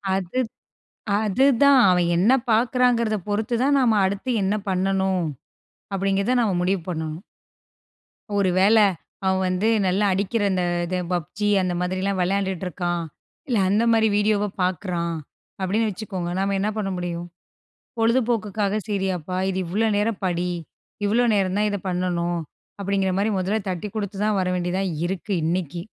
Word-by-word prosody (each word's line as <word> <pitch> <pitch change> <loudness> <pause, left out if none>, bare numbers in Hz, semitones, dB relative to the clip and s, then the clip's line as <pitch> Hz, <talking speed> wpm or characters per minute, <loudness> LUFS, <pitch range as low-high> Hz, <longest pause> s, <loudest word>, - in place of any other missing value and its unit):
அது 190 +5 -2 0.8
அதுதான் 270 +5 +4
அவன் 180 -1 +3
என்ன 205 +8 +4 0.2
பார்க்கிறாங்கிறதப் 235 -3 +2
பொறுத்து 215 +3 -1
தான் 280 +1 +3
நாம 230 -4 +3
அடுத்து 200 +6 -2
என்ன 200 +2 +1
பண்ணணும்? 190 -1 +1 0.7
அப்பிடிங்கிறத 195 +5 +1
நாம 200 -5 +1
முடிவு 185 0 +1
பண்ணனும். 160 -2 -4 1.2
ஒரு 195 -2 +2
வேள, 200 +4 +5 0.5
அவன் 190 0 +2
வந்து 185 +4 0 0.2
நல்லா 190 +3 +2
அடிக்கிற, 200 +4 -1
அந்த 185 -1 0 0.2
இது 180 +1 -2
பப்ஜி 180 +4 -2
அந்த 180 -1 -1
மாதிரிலாம் 185 +2 -1
விளையாண்டுட்டு 190 0 -1
இருக்கான். 175 0 -2 0.4
இல்ல 245 - +1
அந்தமாரி 225 +2 +3
வீடியோவ 210 0 +2
பார்க்குறான். 175 -2 -1 0.4
அப்பிடின்னு 210 +4 +1
வச்சுக்கோங்க, 185 -3 -5
நம்ம 195 0 0
என்ன 205 +2 0
பண்ண 205 -2 -1
முடியும்? 175 -1 -4 0.7
பொழுதுபோக்குக்காக 220 -3 +1
செய்றீயாப்பா, 190 -3 -2
இது 190 - -3
இவ்ளோ 215 +6 +1
நேரம் 210 0 0
படி. 180 0 0 0.6
இவ்ளோ 235 +4 +3
நேரம் 195 -1 +1
தான் 210 0 +2
இத 205 - -2
பண்ணணும். 175 -1 -1 0.4
அப்பிடிங்கிறமாரி 195 +1 0
மொதல்ல 200 +4 0
தட்டிக் 185 +3 -5
கொடுத்துதான் 205 0 -1
வர 180 - 0
வேண்டியதா 180 +2 -1 0.2
இருக்கு, 190 +3 -4
இன்னக்கி! 170 0 -2
195 Hz, 130 wpm, -23 LUFS, 180-215 Hz, 1.2 s, வேள